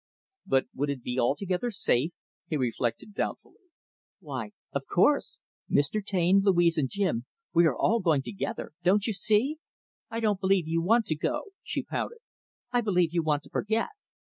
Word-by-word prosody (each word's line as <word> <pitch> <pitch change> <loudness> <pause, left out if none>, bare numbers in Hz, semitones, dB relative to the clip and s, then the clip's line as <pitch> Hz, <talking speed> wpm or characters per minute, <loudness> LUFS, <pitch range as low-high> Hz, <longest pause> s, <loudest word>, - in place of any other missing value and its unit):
"But 135 0 +3
would 145 +2 -1
it 135 -4 -3
be 125 +1 -2
altogether 180 - 0
safe?" 165 - +1 0.4
He 155 - -1
reflected 125 - -2
doubtfully. 375 - -5 0.5
"Why, 130 - -6 0.2
of - - -3
course, - - +2 0.3
Mr. 145 +9 +2
Taine, 190 0 +3
Louise, 175 -4 +4
and 135 -3 0
Jim, 165 - -1 0.3
we 170 -1 +6
are 140 - 0
all 230 - +3
going 160 -8 +2
together 200 - -4
don't 195 +4 +3
you 225 - 0
see? 220 +10 +2 0.5
I 230 - -3
don't 210 -4 +1
believe 190 -3 +2
you 165 +1 +1
want 225 +6 +3
to 155 - 0
go," 395 - -2
she - - -3
pouted. 470 - -4 0.5
"I 245 -1 +2
believe 180 -6 +2
you 170 - +2
want 150 -2 0
to - - -17
forget." 220 +2 0
180 Hz, 165 wpm, -28 LUFS, 145-210 Hz, 0.5 s, we